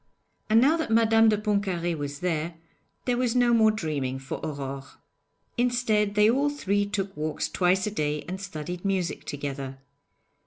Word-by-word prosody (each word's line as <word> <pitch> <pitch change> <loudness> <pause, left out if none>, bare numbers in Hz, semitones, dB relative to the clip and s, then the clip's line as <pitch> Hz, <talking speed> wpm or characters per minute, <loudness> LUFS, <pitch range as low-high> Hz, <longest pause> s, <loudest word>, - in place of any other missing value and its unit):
And 220 +1 +6
now 290 +7 +4
that 320 - -2
Madame 225 0 +5
de 210 - +2
Pontcarré 195 -5 -1
was 145 -1 -5
there, 170 -1 -1 0.5
there 245 -1 +1
was 250 -1 +1
no 245 -1 +4
more 220 -1 +5
dreaming 150 -11 -2
for 135 0 -6
Aurore. 140 -3 -4 0.8
Instead, 225 -4 +1
they 210 0 +5
all 275 +6 +3
three 205 -8 0
took 195 -1 -3
walks 155 0 -2
twice 185 +1 +2
a 210 - -2
day 150 -5 -1
and 190 +2 -5
studied 175 -2 -6
music 190 -3 -1
together. 140 -2 -5
195 Hz, 160 wpm, -26 LUFS, 155-225 Hz, 0.8 s, And